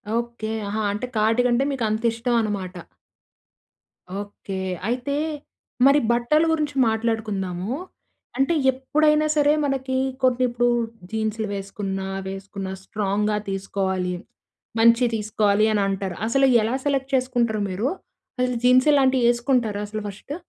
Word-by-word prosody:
Okay. 235 -2 -3 0.2
ఆహా! 215 +2 -2
అంటే 210 +4 -3
కాటుక 225 +3 +3
అంటే 250 +3 +3
మీకు 260 -4 -2
అంత 220 +2 -2
ఇష్టం 235 +1 -1
అనమాట. 200 -4 -3 1.5
ఓకే. 200 -1 -7 0.3
అయితే 250 +4 -1 0.7
మరి 280 +2 +6
బట్టలు 275 +7 +3
గురించి 300 -2 -1
మాట్లాడుకుందాము. 220 -3 -2 0.6
అంటే 270 +5 +2 0.2
ఎప్పుడైనా 300 +4 +2
సరే, 295 0 +4
మనకి 265 -1 -1 0.3
కొన్ని 255 0 +3
ఇప్పుడు 240 0 +1 0.4
జీన్స్‌లు 220 0 -2
వేసుకున్నా, 195 -1 -4 0.2
వేసుకున్నా 195 0 -6
స్ట్రాంగ్‌గా 210 +1 -1
తీసుకోవాలి, 190 -1 -2 0.7
మంచియి 230 +1 +5
తీసుకోవాలి 210 0 +2
అని 205 - +2
అంటారు. 195 -2 -3
అసలు 270 +3 +3 0.2
ఎలా 230 +4 0
సెలెక్ట్ 275 -1 -1
చేసుకుంటారు 240 -4 0
మీరు? 195 +7 -1 0.5
అసలు 250 -1 +1
జీన్స్ 255 +3 +5
ఇలాంటివి 265 -3 +3
వేసుకుంటారా 240 -4 +1
అసలు 215 +1 -5
ఫస్టు? 210 +9 -7
225 Hz, 120 wpm, -23 LUFS, 205-255 Hz, 1.5 s, మరి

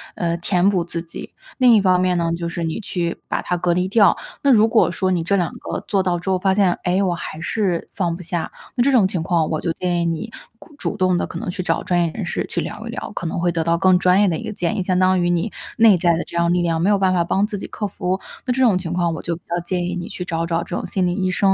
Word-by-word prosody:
呃， 170 -1 -1
填 180 +2 +1
补 185 -4 +2
自 170 -1 -5
己， 170 - -10 0.3
另 245 -2 +6
一 210 - +5
方 185 -2 +3
面 180 -1 +2
呢 165 -1 0
就 170 0 -4
是 170 0 -4
你 165 +6 -2
去 175 -5 -3
把 - - -2
它 180 - -1
隔 175 0 +1
离 180 +1 +1
掉。 205 -2 +4 0.2
那 280 - +4
如 220 -2 +6
果 225 -5 +3
说 185 +1 0
你 175 -2 +1
这 200 +4 +1
两 175 -4 0
个 - - -4
做 195 -2 +2
到 180 -2 0
之 190 +3 -3
后 185 - +1
发 190 0 +2
现， 190 -4 +3
诶， 185 +2 +1
我 180 -2 +1
还 160 -2 -6
是 180 0 -1
放 170 -3 -1
不 180 - -10
下， 170 0 -3 0.2
那 245 - +2
这 280 - +3
种 225 -8 +5
情 180 -4 -2
况 165 -3 +1
我 155 - -1
就 170 - -1
建 175 0 -1
议 170 - 0
你 170 +7 -3 0.3
咕 305 - -16
主 - - -2
动 185 -1 +2
地 - - -1
可 - - -7
能 - - -6
去 185 - -4
找 - - -1
专 175 -1 +1
业 165 - -1
人 - - -5
士 - - -2
去 - - -1
聊 - - -5
一 - - -6
聊， - - -6
可 170 - -4
能 160 - -3
会 175 0 +1
得 165 -1 -1
到 170 +1 +1
更 185 +1 +4
专 185 +1 +4
业 205 - +4
的 170 - +1
一 225 - -5
个 220 - -4
建 180 -2 -2
议， 195 - -1
相 180 0 0
当 185 -1 +3
于 175 - +1
你 175 +5 0 0.3
内 225 -4 +7
在 170 0 +2
的 165 - -1
这 - - -12
样 170 0 +2
力 175 0 +2
量， 165 -1 0
没 190 - +2
有 205 - +4
办 190 -1 +2
法 175 -2 +2
帮 195 +4 +1
自 205 -2 -5
己 - - -6
克 210 - -4
服， 185 0 -2 0.3
那 - - +2
这 260 +1 +2
种 225 -6 +5
情 170 -3 -5
况， 175 -2 0
我 - - -5
就 170 -1 -3
比 170 - -15
较 175 +1 -1
建 175 0 -2
议 180 0 -3
你 175 - -5
去 180 - -6
找 165 -1 -2
找 170 0 -1
这 175 - -5
种 - - -3
心 185 -2 0
理 175 - 0
医 185 0 -1
生 195 +1 +3
180 Hz, 335 characters per minute, -21 LUFS, 170-195 Hz, 0.3 s, 内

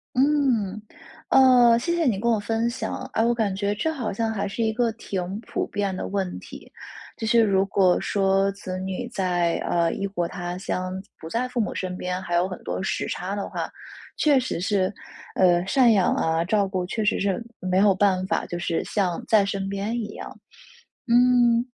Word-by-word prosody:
嗯。 255 -8 +1 0.5
呃， 245 -3 +6
谢 340 +8 -1
谢 335 - +1
你 220 -8 +1
跟 235 +3 +1
我 225 - +2
分 225 +3 -1
享。 235 - -4
哎， 225 - +2
我 240 0 +2
感 210 -5 0
觉 205 +1 -1
这 320 +10 -1
好 250 -9 -3
像 225 +2 -1
还 205 -2 -2
是 215 +4 -3
一 220 - +2
个 230 0 0
挺 195 -2 -5
普 230 - -3
遍 200 -2 -2
的 - - -4
问 190 -2 -3
题。 - - -12 0.5
就 225 - -4
是 235 0 +4
如 195 -2 +3
果 185 -2 +3
说 195 0 +1
子 185 -2 -6
女 190 +6 -4
在， 180 -6 0
呃， 170 -1 +1
异 200 - -3
国 175 -3 -2
他 175 -1 -5
乡， 185 0 -3
自 200 - -16
不 160 - -9
在 250 +2 -1
父 250 - -5
母 215 - -1
身 180 -1 -4
边， 180 0 -3
还 175 -2 -4
有 175 +2 +3
很 185 - -8
多 - - -3
时 - - -2
差 185 +3 -3
的 200 - -4
话， - - -4 0.5
确 290 -3 +4
实 255 -9 -2
是， 190 0 0 0.4
呃， 175 -2 +4
赡 245 +5 +4
养 195 -4 +3
啊、 160 +1 0
照 200 +1 +1
顾 185 -2 -2
确 220 +4 -3
实 210 - +2
是， 195 -1 +1 0.3
嗯， 185 - -5
没 185 - +3
有 200 0 +5
办 190 -1 +2
法 - - -1
就 175 - -5
是 170 -1 -1
像 185 -5 -1
在 215 -2 +4
身 195 -1 -3
边 200 +3 -3
一 215 -2 -3
样。 - - -9 0.7
嗯， 240 -1 +4
200 Hz, 220 characters per minute, -24 LUFS, 185-230 Hz, 0.7 s, 呃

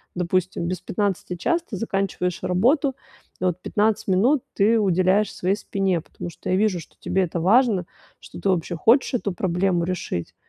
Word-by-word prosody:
допустим, 180 +1 -1
без 180 0 -3
15 190 -2 -2
час 340 - +1
ты 205 - -4
заканчиваешь 195 -3 -2
работу, 265 - +2 0.5
и - - 0
вот 180 0 0
15 210 +2 0
минут 235 +9 +3
ты 215 +3 +3
уделяешь 190 +1 +2
своей 185 +2 0
спине, 195 -4 -1
потому 175 - -8
что - - -8
я 185 - +2
вижу, 205 -3 +1
что - - -17
тебе 190 - 0
это 170 -1 -3
важно, 205 -1 +3 0.3
что - - -12
ты 200 - 0
вообще 175 -1 0
хочешь 235 - +3
эту 220 -5 -1
проблему 180 -1 0
решить. 175 - -4
190 Hz, 170 wpm, -23 LUFS, 180-210 Hz, 0.5 s, минут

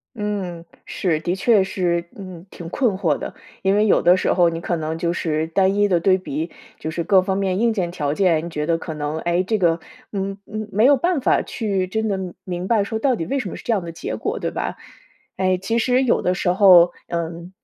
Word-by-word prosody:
嗯， 195 -5 -4 0.2
是， 165 -5 -1
的 175 +3 -2
确 205 +1 +3
是， 175 -3 -1
嗯， 185 -3 -9
挺 170 - -9
困 220 -1 0
惑 165 -7 +1
的。 - - -6 0.3
因 195 +1 +2
为 210 +1 +3
有 210 - +4
的 175 +2 +5
时 - - +1
候 175 -2 +4
你 165 0 -4
可 175 - -2
能 160 0 -3
就 170 +1 -1
是 160 -2 -1
单 190 +4 +2
一 205 0 +3
的 175 -3 +2
对 185 +2 +3
比， 165 -2 -4 0.3
就 160 - -4
是 170 +1 -3
各 190 -1 +4
方 190 +1 -1
面 190 -1 0
硬 235 0 +3
件 185 -5 -2
条 150 -5 -2
件， 170 -3 +2
你 170 - -5
觉 150 -2 -3
得 165 0 +1
可 160 -1 -6
能， 150 +1 -3
诶， 175 +2 0
这 215 +2 -1
个， 170 -2 +2 0.3
嗯 195 0 -3
嗯， 215 0 -5
没 215 +4 +3
有 280 +1 +6
办 340 +1 0
法 - - +2
去 200 -5 -2
真 220 +4 -2
的 190 -3 -3
明 180 0 -4
白 220 -2 +3
说 220 +2 -3
到 255 +2 +2
底 165 - -4
为 275 - -1
什 210 -8 -3
么 - - -7
是 - - -10
这 - - -1
样 200 -5 -1
的 170 - -6
结 165 - -5
果， - - -3
对 - - -2
吧？ - - -4 0.6
诶， 185 -1 +2
其 225 +5 -1
实 250 +2 +2
有 255 -3 +2
的 180 - +2
时 180 0 -1
候， 180 -2 +7 0.2
嗯， 170 +1 -4
185 Hz, 260 characters per minute, -21 LUFS, 170-205 Hz, 0.6 s, 候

